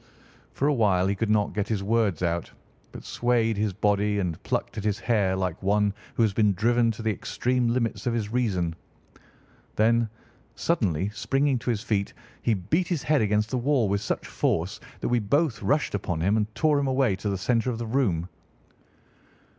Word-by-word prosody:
For 140 - 0
a 150 - +3
while 100 -7 +3
he 100 - +1
could 105 +2 -2
not 105 -1 +2
get 105 -1 -1
his 105 -4 -1
words 105 -5 +1
out, 85 -1 -1 0.4
but - - -10
swayed 120 -2 +1
his 105 0 0
body 105 +1 +1
and 90 -5 -2
plucked - - -2
at - - -5
his 105 -1 0
hair 105 -4 +1
like 90 -2 -2
one 100 +1 +2 0.2
who 115 - +3
has 105 -3 +2
been 105 -1 +3
driven 115 +4 +2
to 110 - -8
the 110 - +1
extreme 125 +3 -1
limits 115 0 -1
of 120 - +1
his 105 -3 -2
reason. 95 -9 0 1.0
Then, 115 +1 +3 0.5
suddenly 100 - 0
springing 135 +5 0
to 125 - -4
his 110 -3 -1
feet, 100 -4 -1 0.3
he 115 - +2
beat 130 - 0
his 170 -6 -2
head 150 -2 +2
against 105 +1 +1
the 130 - 0
wall 130 -3 +2
with 100 +1 0
such 100 - -3
force 90 +5 -1 0.2
that - - -1
we 120 0 +2
both 140 +6 +1
rushed 145 +1 +1
upon 90 -5 -2
him 100 +5 +2
and 105 0 -1
tore 155 -2 +3
him 140 - 0
away 130 -6 +2
to 105 - -3
the 100 - -1
centre 115 +5 +1
of 120 - -2
the 120 - -4
room. 110 -9 0
110 Hz, 195 wpm, -26 LUFS, 100-120 Hz, 1.0 s, a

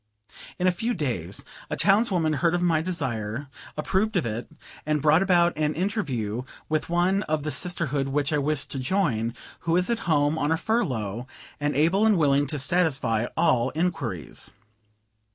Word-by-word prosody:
In 180 - -1
a 185 - +5
few 225 +7 -2
days 100 - -3 0.2
a - - -1
townswoman 195 -6 +3
heard 170 +2 +2
of 175 - 0
my 165 -3 +3
desire, 130 - -3 0.3
approved 200 +7 0
of 175 - +2
it, 115 +1 -4 0.3
and 155 0 0
brought 155 +4 +4
about 175 -2 +3
an 150 0 0
interview 135 - -1 0.3
with 155 0 -1
one 180 +3 +2
of 155 -2 0
the 155 - -2
sisterhood 145 -3 -1
which 145 +2 0
I 150 - +2
wished 150 0 -2
to 135 - -3
join, 130 - 0 0.2
who 165 - -1
was 180 +6 +2
at 235 - 0
home 150 0 +3
on 145 - +1
a 160 - +3
furlough, 125 - -1 0.3
and 145 -1 -1
able 170 +8 +3
and 220 -3 +4
willing 145 -2 +3
to 150 - -3
satisfy 135 -7 +1
all 130 -8 +3
inquiries. 135 - -2
155 Hz, 170 wpm, -26 LUFS, 130-180 Hz, 0.3 s, a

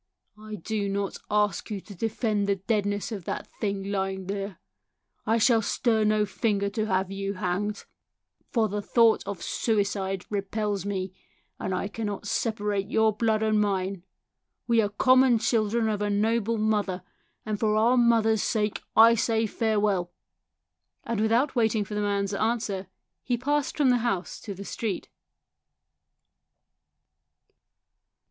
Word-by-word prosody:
I 215 0 -7
do 205 +2 -3
not 200 0 -2
ask 210 0 +1
you 210 -2 -3
to 205 - -12
defend 215 0 -1
the 200 - +3
deadness 205 +1 -1
of 200 -6 -6
that - - -3
thing 200 -2 -2
lying 190 -1 -2
there. 195 0 -4 0.7
I 225 +1 +3
shall 230 0 +4
stir 220 +1 +1
no 215 0 +3
finger 200 -1 -1
to 215 +1 -1
have 190 -1 0
you 195 0 -3
hanged, 185 +3 -2 0.6
for 225 -3 +2
the 210 0 -3
thought 230 +2 +4
of 200 -4 -5
suicide 195 -3 -1
repels 205 -1 -2
me, 190 -2 -3 0.5
and 190 - -3
I 185 +2 -1
cannot 205 -1 -4
separate 210 -2 -1
your 220 -1 +3
blood 220 0 +1
and 215 -1 +2
mine. 195 -2 -1 0.6
We 230 -1 +3
are 205 - 0
common 255 +3 +4
children 225 0 +1
of 210 -1 -1
a 205 - 0
noble 225 +2 +1
mother, 205 -4 0 0.4
and 215 -1 -2
for 215 -1 +2
our 230 +4 +4
mother's 225 -3 +3
sake 210 -1 -1
I 225 +1 +8
say 225 0 +1
farewell." 210 -5 0 0.9
And 230 -3 -2
without 235 +6 +2
waiting 220 -3 +2
for 210 - -8
the 210 - -1
man's 200 -1 0
answer 210 -3 -1 0.3
he 245 -2 -1
passed 290 +4 -1
from 280 -4 +4
the 245 - +4
house 210 -6 -2
to 200 - -6
the 200 +2 -8
street. 215 -1 -4
210 Hz, 145 wpm, -27 LUFS, 200-225 Hz, 0.9 s, I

